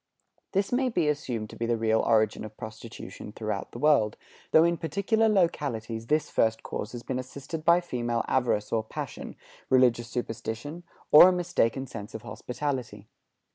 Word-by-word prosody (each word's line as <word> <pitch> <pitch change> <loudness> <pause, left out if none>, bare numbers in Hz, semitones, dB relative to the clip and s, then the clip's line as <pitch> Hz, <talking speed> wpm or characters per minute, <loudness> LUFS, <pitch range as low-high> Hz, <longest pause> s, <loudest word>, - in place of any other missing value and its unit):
This 195 0 +1
may 255 +1 +2
be 175 -9 +1
assumed 125 -7 -2
to - - -10
be 115 - -3
the 120 0 +1
real 110 0 +2
origin 110 -2 +2
of 110 0 -9
prostitution 110 -1 -9
throughout 105 -2 -4
the - - -8
world, 125 -6 +3 0.3
though 160 - +6
in 170 0 +3
particular 200 +8 +1
localities 120 - 0
this 155 +3 +1
first 110 0 +1
cause 105 - -5
has 120 -1 -7
been 130 -1 -3
assisted 140 +5 -7
by 170 +2 +5
female 120 -7 -2
avarice 120 -5 +1
or 110 -1 +1
passion, 110 - -7 0.3
religious 125 -2 +4
superstition, 120 +6 -5 0.3
or 165 +5 +10
a - - +3
mistaken 170 -8 0
sense 115 -4 -8
of 110 - -7
hospitality. 125 0 -5
125 Hz, 165 wpm, -27 LUFS, 110-155 Hz, 0.3 s, or